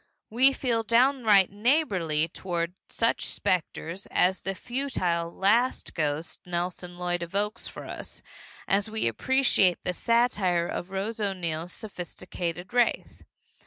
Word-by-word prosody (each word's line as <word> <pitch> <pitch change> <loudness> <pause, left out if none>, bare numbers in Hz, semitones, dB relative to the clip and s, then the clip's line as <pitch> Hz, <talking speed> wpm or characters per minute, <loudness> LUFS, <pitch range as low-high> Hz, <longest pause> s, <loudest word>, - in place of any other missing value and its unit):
We 255 +4 +5
feel 245 -4 0
downright 230 -4 +4
neighborly 200 - +2
toward 170 0 -3 0.2
such 230 0 0
specters 180 +1 -2
as 185 +1 +2
the 195 0 -3
futile 185 -10 -2
"last 225 +8 +1
ghost" 155 0 -2
Nelson 180 0 -4
Lloyd 175 -1 -2
evokes 200 +5 -2
for - - -9
us, - - -8 0.4
as 200 +2 +1
we 220 - 0
appreciate 195 - +3
the 180 - -1
satire 200 -6 +2
of 175 - -4
Rose 200 +4 -3
O'Neill's 175 -4 -2
sophisticated 180 -2 -6
wraith. 245 -1 +1
190 Hz, 120 wpm, -27 LUFS, 175-230 Hz, 0.4 s, We